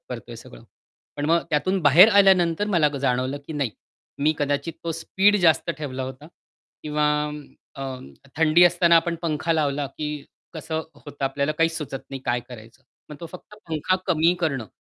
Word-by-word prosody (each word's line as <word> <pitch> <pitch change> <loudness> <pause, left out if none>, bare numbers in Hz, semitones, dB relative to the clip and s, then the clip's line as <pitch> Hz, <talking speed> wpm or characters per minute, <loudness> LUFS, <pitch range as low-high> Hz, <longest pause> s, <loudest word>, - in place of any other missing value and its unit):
करतोय - - -7
हे - - -8
सगळं. - - -14 0.5
पण 145 - -3
मग 165 +2 +3
त्यातून 185 +5 0
बाहेर 155 +8 +8
आल्यानंतर 190 -2 +4
मला 170 -7 +3
जाणवलं 130 +1 -1
की - - -6
नाही. 140 -6 -2 0.5
मी 150 +2 +2
कदाचित 145 +2 -1
तो 165 - -2
स्पीड 190 +5 +2
जास्त 165 -1 +3
ठेवला 135 -3 -5
होता. 130 +3 -8 0.6
किंवा 150 0 -1 0.7
अ, 135 - -6 0.5
थंडी 160 +2 +4
असताना 170 -1 +4
आपण 170 +1 +1
पंखा 165 0 -1
लावला, 145 -3 0
की 150 +3 -6 0.5
कसं 160 0 -4
होतं 145 -2 -7
आपल्याला 140 +2 -1
काहीच 165 +1 0
सुचत 140 -3 -5
नाही 135 -1 -6
काय 120 0 0
करायचं? 120 +1 -13 0.3
मग 150 - -9
तो 170 - -6
फक्त 185 +3 -12
पंखा 160 +3 0
कमी 170 -1 +3
करणं 135 -9 -1
155 Hz, 165 wpm, -23 LUFS, 140-170 Hz, 0.7 s, बाहेर